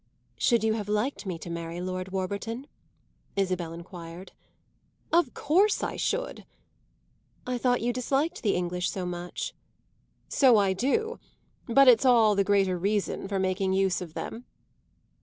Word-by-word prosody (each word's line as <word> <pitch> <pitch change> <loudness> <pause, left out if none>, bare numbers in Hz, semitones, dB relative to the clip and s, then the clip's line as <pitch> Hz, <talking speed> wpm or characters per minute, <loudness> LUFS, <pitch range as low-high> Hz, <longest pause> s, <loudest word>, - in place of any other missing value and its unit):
"Should 235 -3 +2
you 220 0 +2
have 210 -2 -4
liked 210 +2 -1
me 180 -3 -3
to 165 - -9
marry 170 0 -5
Lord 185 +1 -4
Warburton?" 200 +7 -3 0.7
Isabel 185 -4 -1
enquired. 170 +1 -9 0.8
"Of 335 -7 +3
course 380 +8 +2
I - - -2
should." - - -2 1.0
"I 250 -1 -2
thought 245 0 +2
you 240 +1 0
disliked 275 +8 -1
the 205 - +1
English 180 0 -1
so 185 -3 -4
much." 175 0 -5 0.7
"So 255 -5 +5
I 195 -2 +3
do; 435 - 0 0.5
but 275 +3 +5
it's 245 -1 +7
all 230 -5 +5
the 200 0 +2
greater 195 -2 +2
reason 200 +1 -1
for 195 0 -2
making 190 0 0
use 190 -1 +1
of 165 -3 -8
them." 235 +3 -6
200 Hz, 145 wpm, -27 LUFS, 185-245 Hz, 1.0 s, it's